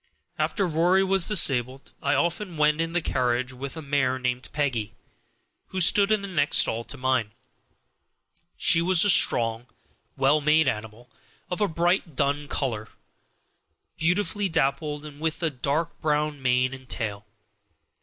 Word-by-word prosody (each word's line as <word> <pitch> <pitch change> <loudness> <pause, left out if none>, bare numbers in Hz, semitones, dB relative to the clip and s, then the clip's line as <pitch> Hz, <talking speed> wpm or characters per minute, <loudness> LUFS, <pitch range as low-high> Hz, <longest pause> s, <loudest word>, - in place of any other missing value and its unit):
After 195 - 0
Rory 175 +4 +2
was 195 -2 +1
disabled 135 - +1
I - - +1
often 170 +4 -2
went 150 +1 +2
in 165 0 -3
the 175 -1 0
carriage 125 -1 -1
with 135 +4 -8
a 160 - -7
mare 135 -2 0
named 125 0 -3
Peggy, 130 -8 -2 0.7
who 190 - -5
stood 200 +3 +4
in 215 -2 +1
the - - -4
next 175 -6 +1
stall 115 +1 +3
to 145 - -6
mine. 125 -5 -1 1.2
She 165 - +3
was 180 +1 +4
a 205 - +6
strong, 115 -7 +3 0.5
well 140 +3 +3
made 155 +1 +3
animal, 110 +2 -5 0.4
of 180 - -3
a 205 - +3
bright 170 -1 -1
dun 145 +1 -1
color, 115 -8 -3 1.1
beautifully 200 +4 0
dappled, 150 -1 -1
and 145 -1 -11
with 160 +2 -3
a 160 - +1
dark 145 +5 -3
brown 150 -1 -1
mane 125 0 +1
and 130 -1 -12
tail. 105 -2 -5
145 Hz, 150 wpm, -25 LUFS, 130-170 Hz, 1.2 s, a